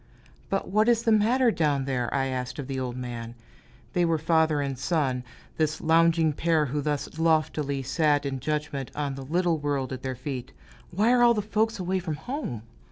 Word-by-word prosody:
"But 195 - -1
what 215 +4 +3
is 235 -1 +3
the 230 - +2
matter 230 +4 +4
down 145 -7 +1
there?" 125 -3 -1
I 135 -1 +1
asked 125 -1 -3
of 145 - -4
the 135 0 -4
old 125 -1 -4
man, 120 -2 -6 0.6
they 175 - +2
were 165 -1 +2
father 160 -1 +2
and 140 -1 -2
son, 130 -2 0 0.3
this 155 0 0
lounging 165 -1 +3
pair 160 0 +2
who 145 +2 -2
thus 150 +2 -3
loftily 155 -4 +1
sat 145 +1 +1
in 135 -1 -2
judgment 150 -1 -3
on 145 -2 -2
the 135 - -7
little 170 +3 +1
world 140 -3 -2
at 130 - -6
their 130 -1 -3
feet; 130 -1 -6 0.4
"why 210 +7 +2
are 250 -1 +4
all 240 -1 +6
the 210 - 0
folks 220 +2 0
away 185 0 -1
from 165 -4 -3
home?" 160 - -5
150 Hz, 195 wpm, -26 LUFS, 135-175 Hz, 0.6 s, all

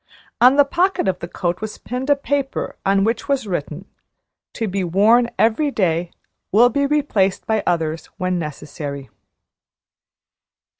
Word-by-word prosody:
On 250 +3 +7
the 285 0 +6
pocket 350 - 0
of 185 -2 0
the 170 - -6
coat 175 +1 -3
was 215 -1 -5
pinned 250 +3 -5
a 285 - +6
paper 280 -1 -2
on 195 0 +2
which 230 +6 -1
was 275 -4 +1
written, 175 -2 -4 0.7
"To 225 - -2
be 195 0 -2
worn 215 +7 +4
every 230 +7 +2
day 175 -8 0 0.4
will 235 +5 +6
be 280 +2 0
replaced 275 -11 +1
by 220 -1 +1
others 160 -2 -1
when 185 -1 -1
necessary." 145 -2 -6
205 Hz, 145 wpm, -20 LUFS, 175-265 Hz, 0.7 s, On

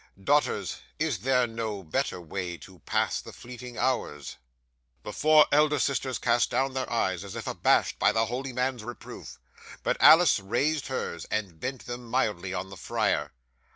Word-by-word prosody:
Daughters, 145 +6 +1 0.2
is - - -1
there 125 -1 +2
no 110 -4 -4
better 80 +2 -2
way 90 +1 -5
to 95 0 -14
pass - - 0
the - - -11
fleeting 125 0 -10
hours?" 75 - -2 0.7
'The - - -6
four 155 0 +6
elder 150 0 +4
sisters 135 -1 0
cast 120 -1 +2
down 135 0 0
their 130 0 -3
eyes 95 -6 0
as 100 - -8
if - - -5
abashed - - +2
by - - +4
the 110 0 +2
holy 130 +4 -4
man's 125 -2 -2
reproof, 120 +1 -9 0.5
but - - 0
Alice 160 -3 +7
raised 140 +9 0
hers, 85 -10 -4
and 100 -7 -3
bent 130 +3 -5
them 120 0 -6
mildly 105 -7 0
on 95 +1 -4
the 100 - -9
friar. - - -1
120 Hz, 165 wpm, -27 LUFS, 95-130 Hz, 0.7 s, Alice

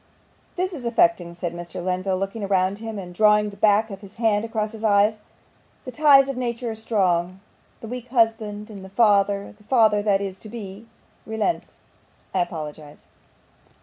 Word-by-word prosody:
'This 370 +1 -2
is 280 -7 -7
affecting!' 225 -7 +2
said 175 -1 -4
Mr. 170 0 -9
Lenville, 185 +1 -1
looking 195 +2 -3
round 190 +1 +1
him, 225 -1 -6
and 180 -2 -7
drawing 210 +1 +4
the - - -12
back 210 +2 +3
of 195 0 -8
his 200 -1 -13
hand 220 -2 +1
across 220 -2 -2
his 225 -1 -10
eyes. 210 0 +3 0.7
'The 255 - -6
ties 275 0 +6
of 275 - -3
nature 240 -1 -3
are - - -4
strong. 185 -5 0 0.4
The 225 - -7
weak 250 +1 -6
husband 225 -3 0
and 200 -2 -9
the 190 - -10
father 200 -1 +2
the 210 - -23
father 220 -4 +4
that 205 -2 +2
is 195 -1 -5
yet - - -28
to 215 - -10
be 210 -1 -9 0.4
relents. 220 +9 -2 0.6
I 190 - +1
apologise. 155 -3 -5
210 Hz, 180 wpm, -23 LUFS, 190-225 Hz, 0.7 s, ties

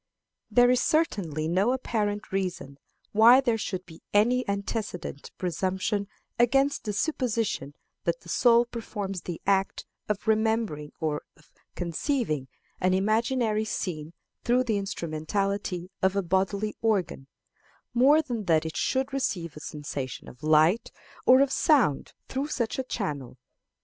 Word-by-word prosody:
There 245 0 +5
is 250 -1 +3
certainly 180 - 0
no 190 +9 +2
apparent 210 -5 -2
reason 180 -8 -3 0.3
why 230 +4 +7
there 235 -4 +1
should 185 -3 -4
be 165 -2 -14
any 245 +5 +4
antecedent 200 - -4
presumption 190 +3 -1 0.3
against 270 +4 +3
the 210 - -1
supposition 225 - -1 0.3
that 170 0 0
the - - -16
soul 235 +5 +4
performs 205 -5 -5
the 175 -2 -6
act 195 -1 +1 0.2
of 210 0 -2
remembering 220 -9 +1
or 150 -2 -1 0.2
of 150 - -24 0.2
conceiving 170 - -1 0.3
an 185 0 +2
imaginary 220 +2 +1
scene 165 -7 -4 0.3
through 250 +1 +3
the 220 -5 0
instrumentality 185 +1 -3
of 190 +1 +2
a 200 - +1
bodily 195 +4 0
organ, 195 -11 0 0.7
more 280 +6 +5
than 235 -8 -4
that 160 -2 +3
it 160 - -5
should 265 +1 0
receive 180 - -2
a - - -8
sensation 145 -4 -6
of 125 - -13
light 155 +7 +3 0.4
or 255 +1 +8
of 275 -1 +3
sound 270 - +2
through 270 +2 -2
such 240 -5 -2
a - - 0
channel. 145 - -4
200 Hz, 135 wpm, -27 LUFS, 170-235 Hz, 0.7 s, or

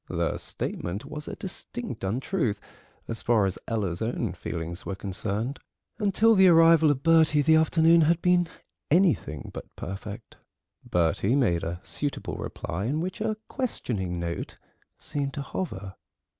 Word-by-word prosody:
The - - -1
statement 90 +5 -4
was 150 -1 -7
a - - -5
distinct 120 - -5
untruth 120 - -1 0.5
as 115 -1 -4
far 115 -4 +3
as 95 0 -2
Ella's 100 -7 -2
own 115 +2 -1
feelings 85 +2 -5
were 100 - -4
concerned; 100 +6 -3 0.4
until 215 +2 +4
the 190 -3 +6
arrival 165 -2 +7
of 140 -2 0
Bertie 160 -2 +5
the 160 +2 +5
afternoon 160 +1 +5
had 160 +2 +3
been 180 0 +3 0.4
anything 150 - +2
but - - -9
perfect. 100 +4 -7 0.5
Bertie 90 +7 +1
made 105 -12 +2
a 85 +1 -3
suitable 145 -1 -3
reply, 90 +5 -4
in 145 +6 0
which 185 +4 -4
a 215 -1 0
questioning 100 - -2
note 85 0 -4 0.4
seemed 140 -2 -3
to 140 - -3
hover. 100 - -5
130 Hz, 145 wpm, -27 LUFS, -, 0.5 s, arrival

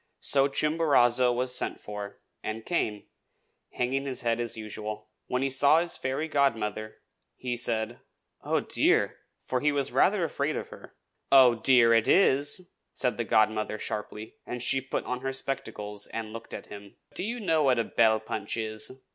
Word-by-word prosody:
So 140 -1 +4
Chimborazo 140 -5 +3
was 125 +1 0
sent - - -2
for, 105 -1 -8 0.2
and 110 +1 -5
came, 110 -12 -1 0.7
hanging 135 +3 -1
his 130 - -4
head 115 -1 0
as 120 -1 -2
usual. 110 0 -7 0.2
When 125 +1 -1
he 135 - +1
saw 140 +4 +5
his 170 0 -2
fairy 135 +4 -2
godmother, 110 -7 -1 0.4
he 125 -1 -4
said, 115 -1 -2 0.4
"Oh, - - 0
dear!" - - +2 0.3
for 130 - -1
he 150 +3 +2
was 140 -1 -1
rather 195 -2 +3
afraid 150 -1 -1
of - - -5
her. - - -13 0.4
"'Oh, 130 -3 +8
dear!' 115 0 +5
it 115 -1 +3
is!" 175 0 +2 0.2
said 125 -4 -1
the 120 - -1
godmother 110 0 +1
sharply; 105 +1 -6
and 125 -1 -5
she 135 +1 +2
put 130 - -4
on 125 0 -3
her 135 - -2
spectacles 105 -6 -4
and 110 -1 -6
looked 115 0 -8
at - - -8
him. 100 -1 -12 0.2
"Do - - -3
you 230 +5 -3
know 165 -7 +1
what 130 -4 +3
a 115 - +2
bell 110 -1 +3
punch 110 0 -4
is?" 110 +4 -4
125 Hz, 170 wpm, -28 LUFS, 110-135 Hz, 0.7 s, Oh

